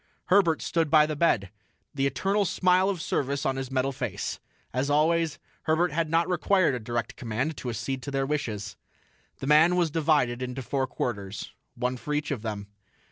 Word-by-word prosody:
Herbert 175 Hz, -4 st, +4 dB
stood 165 Hz, -3 st, 0 dB
by 155 Hz, -1 st, +6 dB
the 155 Hz, 0 st, -3 dB
bed, 110 Hz, -, +2 dB, 0.4 s
the 135 Hz, -1 st, +1 dB
eternal 195 Hz, +10 st, +1 dB
smile 185 Hz, +1 st, +3 dB
of 190 Hz, -3 st, -2 dB
service 140 Hz, 0 st, -1 dB
on 135 Hz, -, +1 dB
his 135 Hz, -1 st, -4 dB
metal 135 Hz, 0 st, 0 dB
face. 125 Hz, -7 st, -4 dB, 0.3 s
As 130 Hz, +3 st, 0 dB
always, 160 Hz, +1 st, +2 dB, 0.3 s
Herbert 160 Hz, +1 st, +2 dB
had 165 Hz, +1 st, 0 dB
not 165 Hz, +1 st, +2 dB
required 185 Hz, -2 st, +2 dB
a 125 Hz, -, -2 dB
direct 120 Hz, +1 st, -3 dB
command 125 Hz, +7 st, -2 dB
to 125 Hz, -, -4 dB
accede 130 Hz, +3 st, -3 dB
to 140 Hz, -, -6 dB
their 135 Hz, -1 st, 0 dB
wishes. 105 Hz, -8 st, -3 dB, 0.6 s
The -, -, -3 dB
man 155 Hz, +5 st, +5 dB
was 175 Hz, -3 st, +2 dB
divided 145 Hz, -6 st, +2 dB
into 125 Hz, +1 st, -4 dB
four 135 Hz, +2 st, -1 dB
quarters, 100 Hz, -6 st, -4 dB, 0.2 s
one 125 Hz, +1 st, -1 dB
for 150 Hz, +4 st, -3 dB
each 150 Hz, 0 st, -2 dB
of 130 Hz, -7 st, -2 dB
them. 105 Hz, -2 st, -4 dB
140 Hz, 185 wpm, -27 LUFS, 125-165 Hz, 0.6 s, by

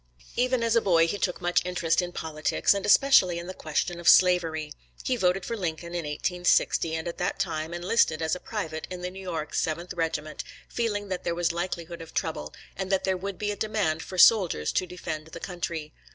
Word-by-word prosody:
Even 250 Hz, 0 st, +1 dB
as 230 Hz, 0 st, +2 dB
a 230 Hz, -, +5 dB
boy 170 Hz, -5 st, +4 dB
he 205 Hz, +4 st, -3 dB
took 180 Hz, -2 st, -1 dB
much 175 Hz, 0 st, +2 dB
interest 175 Hz, -1 st, +1 dB
in 175 Hz, 0 st, -4 dB
politics, 155 Hz, +1 st, 0 dB
and 200 Hz, 0 st, -3 dB
especially 200 Hz, -7 st, +5 dB
in 170 Hz, -, -5 dB
the 185 Hz, -, -6 dB
question 170 Hz, +2 st, -2 dB
of 170 Hz, -, +4 dB
slavery. 165 Hz, -4 st, +4 dB, 0.3 s
He 255 Hz, -, +1 dB
voted 185 Hz, -4 st, +1 dB
for 230 Hz, -, -3 dB
Lincoln 170 Hz, -3 st, -4 dB
in 170 Hz, -2 st, -3 dB
1860, 165 Hz, +1 st, +1 dB
and 160 Hz, +1 st, -4 dB
at 170 Hz, -, -5 dB
that -, -, -1 dB
time 165 Hz, -4 st, -2 dB
enlisted 175 Hz, -1 st, +2 dB
as 160 Hz, 0 st, 0 dB
a -, -, -7 dB
private 165 Hz, -8 st, -5 dB
in 180 Hz, -1 st, -7 dB
the 180 Hz, -, -3 dB
New 190 Hz, +1 st, -9 dB
York 165 Hz, -5 st, -4 dB
7th 170 Hz, +3 st, -2 dB
Regiment, 155 Hz, -2 st, -2 dB, 0.2 s
feeling 205 Hz, -4 st, -2 dB
that 185 Hz, -1 st, -3 dB
there 170 Hz, -, -1 dB
was 170 Hz, -1 st, +1 dB
likelihood 170 Hz, -1 st, -4 dB
of 165 Hz, -, -11 dB
trouble, 75 Hz, +1 st, -2 dB, 0.2 s
and 190 Hz, 0 st, -4 dB
that 195 Hz, -, +2 dB
there 190 Hz, -1 st, +1 dB
would 195 Hz, +1 st, -5 dB
be 210 Hz, -1 st, -1 dB
a -, -, -3 dB
demand 200 Hz, -7 st, -1 dB
for 185 Hz, -, -8 dB
soldiers 180 Hz, -, +5 dB
to 185 Hz, -, 0 dB
defend 160 Hz, -3 st, -6 dB
the 165 Hz, -, -9 dB
country. 165 Hz, -4 st, -5 dB
175 Hz, 210 wpm, -27 LUFS, 160-190 Hz, 0.3 s, a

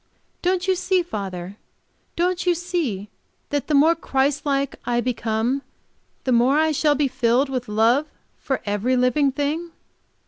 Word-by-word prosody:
Don't 365 Hz, +1 st, 0 dB
you 380 Hz, -, +4 dB
see, 370 Hz, 0 st, +1 dB
father? 195 Hz, -, -6 dB, 0.6 s
Don't 360 Hz, +1 st, 0 dB
you 350 Hz, -, +4 dB
see 325 Hz, -, -2 dB, 0.4 s
that 290 Hz, -1 st, -1 dB
the 300 Hz, -, +1 dB
more 310 Hz, +4 st, +6 dB
Christ 285 Hz, -2 st, -1 dB
like 275 Hz, -1 st, 0 dB
I 240 Hz, 0 st, 0 dB
become 240 Hz, +1 st, -1 dB, 0.6 s
the 260 Hz, -, 0 dB
more 250 Hz, +4 st, +4 dB
I 315 Hz, 0 st, +3 dB
shall 295 Hz, 0 st, +2 dB
be 290 Hz, 0 st, +2 dB
filled 255 Hz, +1 st, +1 dB
with 255 Hz, -2 st, -3 dB
love 230 Hz, +8 st, +2 dB, 0.3 s
for 265 Hz, -, -3 dB
every 210 Hz, +5 st, 0 dB
living 260 Hz, +3 st, +2 dB
thing?" 305 Hz, +5 st, -2 dB
275 Hz, 150 wpm, -22 LUFS, 240-315 Hz, 0.6 s, more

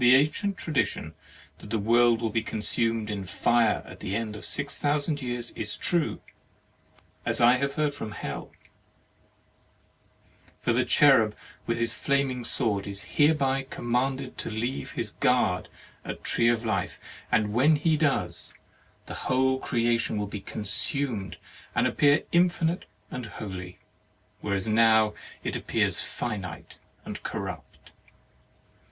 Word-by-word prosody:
The 125 Hz, +1 st, +8 dB
ancient 170 Hz, +8 st, +1 dB
tradition 155 Hz, -5 st, -1 dB, 0.5 s
that -, -, -11 dB
the 115 Hz, -, 0 dB
world 115 Hz, +2 st, +3 dB
will 110 Hz, -, 0 dB
be 115 Hz, -, +1 dB
consumed 110 Hz, 0 st, 0 dB
in 100 Hz, -2 st, -3 dB
fire 115 Hz, +4 st, +2 dB
at -, -, -12 dB
the 100 Hz, -1 st, -3 dB
end 110 Hz, -1 st, -3 dB
of 105 Hz, -, -9 dB
six 140 Hz, -, -2 dB
thousand 145 Hz, 0 st, 0 dB
years 120 Hz, -2 st, -3 dB
is 105 Hz, -1 st, -5 dB
true, 170 Hz, -3 st, 0 dB, 1.0 s
as -, -, +1 dB
I 120 Hz, +2 st, +6 dB
have 140 Hz, +1 st, -1 dB
heard 150 Hz, -1 st, 0 dB
from 110 Hz, -7 st, -6 dB
Hell. -, -, -6 dB, 2.1 s
For -, -, 0 dB
the -, -, +2 dB
cherub -, -, +5 dB, 0.3 s
with -, -, 0 dB
his 115 Hz, 0 st, 0 dB
flaming 140 Hz, -3 st, 0 dB
sword 100 Hz, -4 st, +1 dB
is 100 Hz, -1 st, -3 dB
hereby 135 Hz, -3 st, +2 dB
commanded 130 Hz, +2 st, -2 dB
to -, -, -3 dB
leave 115 Hz, +5 st, -3 dB
his 110 Hz, -3 st, -1 dB
guard 110 Hz, -8 st, +1 dB, 0.4 s
at -, -, -5 dB
[the] -, -, -4 dB
tree 115 Hz, 0 st, +3 dB
of 120 Hz, -1 st, 0 dB
life, 100 Hz, -5 st, -1 dB, 0.3 s
and 105 Hz, -1 st, +2 dB
when 140 Hz, +7 st, +5 dB
he 155 Hz, +2 st, +2 dB
does, 135 Hz, -, 0 dB, 0.5 s
the -, -, -7 dB, 0.2 s
whole 130 Hz, 0 st, +2 dB
creation 115 Hz, -4 st, 0 dB
will 105 Hz, -, -1 dB
be 100 Hz, 0 st, -6 dB
consumed 105 Hz, -, 0 dB, 0.4 s
and -, -, +3 dB
appear 145 Hz, 0 st, +3 dB
infinite 175 Hz, -1 st, +2 dB, 0.3 s
and 125 Hz, -2 st, -5 dB
holy, 95 Hz, -3 st, -7 dB, 0.6 s
whereas 100 Hz, -2 st, -2 dB
it 110 Hz, -, -1 dB
now 110 Hz, -1 st, +5 dB, 0.3 s
appears -, -, 0 dB
finite 105 Hz, -7 st, -5 dB, 0.3 s
and -, -, -6 dB
corrupt. -, -, -7 dB
120 Hz, 140 wpm, -27 LUFS, 105-140 Hz, 2.1 s, The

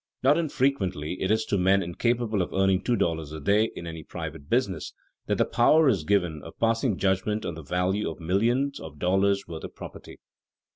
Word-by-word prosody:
Not 140 Hz, +3 st, +5 dB
infrequently 115 Hz, -, -1 dB
it 95 Hz, -, 0 dB
is 110 Hz, +1 st, +2 dB
to 100 Hz, -, 0 dB
men 95 Hz, +2 st, +3 dB
incapable 110 Hz, +4 st, 0 dB
of 90 Hz, -, -3 dB
earning 95 Hz, -1 st, +2 dB
two 120 Hz, -, +1 dB
dollars 80 Hz, -7 st, -1 dB
a 80 Hz, -, -6 dB
day 105 Hz, +8 st, +2 dB
in 85 Hz, -, -7 dB
any 80 Hz, -1 st, -6 dB
private 70 Hz, +1 st, -7 dB
business 115 Hz, -8 st, 0 dB, 0.3 s
that -, -, +1 dB
the -, -, +3 dB
power 150 Hz, +6 st, +4 dB
is 100 Hz, -11 st, +2 dB
given 90 Hz, -4 st, 0 dB
of -, -, -11 dB
passing 115 Hz, -2 st, +1 dB
judgment 100 Hz, +3 st, 0 dB
on -, -, -3 dB
the 80 Hz, -, -8 dB
value 90 Hz, +7 st, -1 dB
of 80 Hz, -, -8 dB
millions 120 Hz, +11 st, +1 dB
of 75 Hz, -2 st, -10 dB
dollars' 95 Hz, +4 st, +1 dB
worth 80 Hz, -2 st, -7 dB
of -, -, -8 dB
property. -, -, -10 dB
95 Hz, 195 wpm, -26 LUFS, 85-115 Hz, 0.3 s, Not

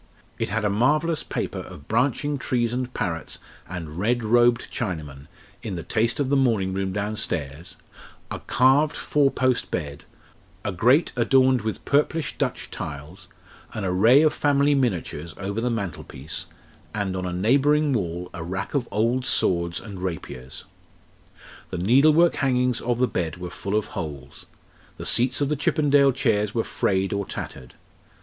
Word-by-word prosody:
It -, -, -1 dB
had 110 Hz, +1 st, -1 dB
a -, -, +3 dB
marvellous 150 Hz, +9 st, +2 dB
paper -, -, -4 dB
of 70 Hz, +1 st, -10 dB
branching 135 Hz, +5 st, 0 dB
trees 120 Hz, -2 st, 0 dB
and 125 Hz, 0 st, -2 dB
parrots 80 Hz, -8 st, -3 dB, 0.3 s
and 85 Hz, -2 st, -6 dB
red 120 Hz, +4 st, +1 dB
robed 120 Hz, +2 st, +3 dB
Chinamen, 75 Hz, -9 st, -4 dB, 0.3 s
in 110 Hz, -6 st, -4 dB
the 85 Hz, -, -5 dB
taste 115 Hz, +5 st, 0 dB
of 140 Hz, -2 st, 0 dB
the -, -, +4 dB
morning 110 Hz, -8 st, +2 dB
room 95 Hz, 0 st, -2 dB
downstairs, 90 Hz, -7 st, -3 dB, 0.5 s
a -, -, -4 dB
carved 135 Hz, +5 st, +3 dB
four 145 Hz, -2 st, +2 dB
post 130 Hz, -2 st, 0 dB
bed, 75 Hz, -4 st, -4 dB, 0.6 s
a 100 Hz, -, 0 dB
grate 125 Hz, -, +3 dB
adorned 130 Hz, +1 st, +4 dB
with 110 Hz, 0 st, -4 dB
purplish 150 Hz, +1 st, +1 dB
Dutch -, -, -2 dB
tiles, 75 Hz, +5 st, -7 dB, 0.5 s
an 105 Hz, -, -3 dB
array 110 Hz, +10 st, +5 dB
of 155 Hz, -, +3 dB
family 145 Hz, 0 st, +3 dB
miniatures 90 Hz, -, -1 dB
over 100 Hz, +3 st, -3 dB
the 125 Hz, -, 0 dB
mantelpiece, 90 Hz, -, -5 dB, 0.5 s
and 100 Hz, -3 st, -2 dB
on 90 Hz, 0 st, -3 dB
a -, -, -3 dB
neighbouring 140 Hz, +10 st, +3 dB
wall 90 Hz, -4 st, -3 dB
a 90 Hz, -4 st, -6 dB
rack 95 Hz, +4 st, -4 dB
of 135 Hz, -5 st, 0 dB
old 115 Hz, +5 st, +1 dB
swords 85 Hz, -6 st, +1 dB
and 100 Hz, -5 st, -9 dB
rapiers. 75 Hz, -8 st, -6 dB, 1.1 s
The -, -, -4 dB
needlework 150 Hz, -, +5 dB
hangings 125 Hz, -3 st, +1 dB
of 120 Hz, 0 st, 0 dB
the 125 Hz, +1 st, +2 dB
bed 85 Hz, -6 st, -3 dB
were 90 Hz, 0 st, -6 dB
full 100 Hz, +3 st, -4 dB
of 110 Hz, -, 0 dB
holes; 75 Hz, -6 st, -7 dB, 0.5 s
the -, -, -7 dB
seats 125 Hz, +3 st, +2 dB
of 140 Hz, -, +1 dB
the 150 Hz, -, +1 dB
Chippendale 145 Hz, -2 st, +3 dB
chairs 110 Hz, -5 st, 0 dB
were 115 Hz, -, +1 dB
frayed 95 Hz, 0 st, 0 dB
or 100 Hz, 0 st, -1 dB
tattered. 65 Hz, -8 st, -7 dB
110 Hz, 155 wpm, -24 LUFS, 90-130 Hz, 1.1 s, array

